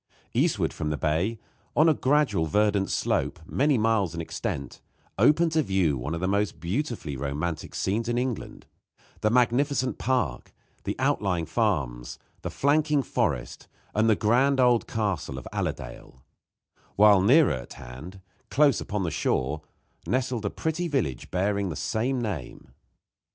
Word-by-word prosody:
Eastward - - +1
from 75 - -3
the 75 - -1
bay, 85 +10 0 0.4
on 155 - +5
a 160 - +6
gradual 130 - +2
verdant 105 +2 +2
slope, - - 0
many 140 - +2
miles 110 -6 +1
in - - -4
extent, 70 -3 -4 0.4
opened 165 +2 +4
to 160 0 +3
view 95 - +1
one 70 +6 -3
of - - -4
the 95 - 0
most 100 +1 0
beautifully 100 - -3
romantic 75 +4 -3
scenes 115 +5 -1
in 120 - 0
England 125 -3 -3 0.5
the 110 - +2
magnificent 125 +3 +2
park, 125 - -1 0.3
the - - -2
outlying 90 -4 0
farms, 75 - -1 0.2
the - - -4
flanking 150 0 +2
forest, - - -2 0.3
and 110 +2 +3
the 110 - +5
grand 130 +7 +2
old 125 -2 +4
castle 95 -11 -2
of 65 - -8
Allerdale; 65 -1 -5 0.7
while 105 -2 +6
nearer 135 - +5
at 65 -2 -7
hand, 75 +11 -10 0.3
close 140 -6 +3
upon 105 -1 -2
the 85 - -1
shore, 75 -1 -1 0.5
nestled 125 -3 -1
a - - +1
pretty 160 - -2
village, 120 - -2
bearing 100 +1 0
the 80 - -4
same 125 +9 -1
name. 100 - -5
105 Hz, 145 wpm, -26 LUFS, 80-130 Hz, 0.7 s, a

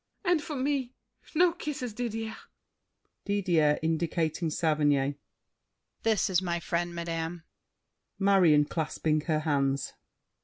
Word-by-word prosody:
And 350 -3 +3
for 300 0 -5
me 265 -2 -1 0.4
No 350 +2 +5
kisses, 280 -8 -5
Didier! 225 -1 -3 0.9
DIDIER 175 -7 +2
(indicating 165 0 0
Saverny). 145 -4 +1 0.8
This 220 -4 +2
is 185 -1 +2
my 170 -2 -1
friend, 170 +1 -2
madame! 165 0 -4 0.7
MARION 185 -7 +5
(clasping 155 0 -1
her 155 -2 +1
hands). 140 -3 0
170 Hz, 105 wpm, -29 LUFS, 155-220 Hz, 0.9 s, No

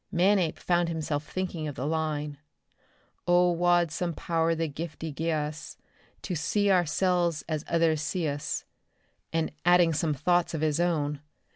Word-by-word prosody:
Manape 180 -2 +2
found 175 -1 +1
himself 155 -2 -3
thinking 180 -4 -3
of 145 - -5
the 130 - -4
line: 150 -2 -2 0.9
"'O 175 0 +5
wad 175 -1 +3
some 170 +1 -2
power 165 +1 0
the 165 0 -1
giftie 155 0 -6
gie 165 +2 -1
us, 150 -1 -4 0.5
to 185 - -3
see 200 +6 +1
oursilves 175 -1 +2
as 155 -2 -2
ithers 165 -2 +2
see 165 +2 -1
us,'" 145 0 -3 0.7
and 165 -1 0
adding 175 -1 +5
some 155 0 0
thoughts 175 +4 +1
of 155 - -3
his 155 0 +1
own. 150 -4 0
165 Hz, 150 wpm, -28 LUFS, 150-175 Hz, 0.9 s, O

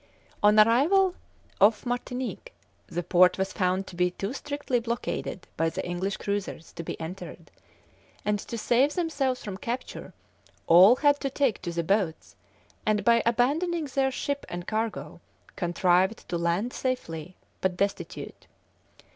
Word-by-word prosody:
On 210 0 +6
arrival 310 - +5 0.5
off 210 +3 +4
Martinique, 250 - -4 0.3
the 175 +1 -3
port 180 +1 +4
was 190 0 -2
found 185 -1 0
to 180 - -11
be 180 0 +2
too 195 +5 -5
strictly 285 -3 -2
blockaded 230 -5 -4
by 165 +1 +1
the - - -5
English 185 +3 -2
cruisers 200 -5 -4
to 170 - -6
be 170 - -6
entered; 170 +4 -8 0.7
and, 210 0 +1
to 230 - -6
save 245 +6 +2
themselves 280 -7 -1
from 200 -4 -5
capture, 240 +5 -5 0.5
all 185 +8 +8
had 285 +1 +3
to 275 - -2
take 270 -5 0
to 175 - -4
the 170 0 -2
boats, 185 - -1 0.5
and 210 -1 +1
by 235 0 +5
abandoning 300 +8 +1
their 270 -1 +1
ship 280 +2 -3
and 175 0 -5
cargo, 195 -9 -3 0.3
contrived 180 +3 +1
to 175 - -2
land 170 +8 0
safely, 185 - -4 0.3
but 185 -1 0
destitute. 200 +1 -4
210 Hz, 145 wpm, -27 LUFS, 180-255 Hz, 0.7 s, all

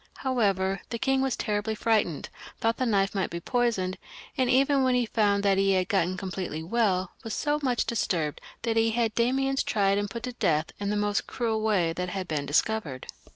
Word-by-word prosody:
However, 195 -7 +1
the 235 - -3
king 270 +2 +1
was 265 -2 0
terribly 210 +1 -1
frightened, 210 -9 0 0.3
thought 225 +1 +1
the 255 - 0
knife 195 -3 +2
might 195 -2 -1
be 170 - -4
poisoned, 210 -3 0 0.4
and 260 -4 +1
even 270 +1 +4
when 255 -1 +3
he 245 -1 +2
foimd 205 -3 +1
that 195 -1 +3
he 195 0 +3
had 185 -1 +1
got 185 -2 +1
completely 185 -4 -4
well, 190 -2 +1
was 225 - -4
so 295 0 0
much 250 -5 +1
disturbed, 170 -9 -1 0.2
that 225 -1 0
he 225 0 +4
had 225 -1 0
Damiens 270 +4 +1
tried 200 -1 +1
and 205 0 -2
put 230 +4 -6
to 250 0 -4
death 165 -8 0
in 200 0 -2
the 210 - 0
most 205 0 0
cruel 225 -3 -1
way 190 -7 +2
that 180 +1 -3
had 185 -1 -4
then 155 - 0
been 140 - -5
dis 145 - +4
covered. 185 -13 -4
210 Hz, 210 wpm, -27 LUFS, 190-235 Hz, 0.4 s, even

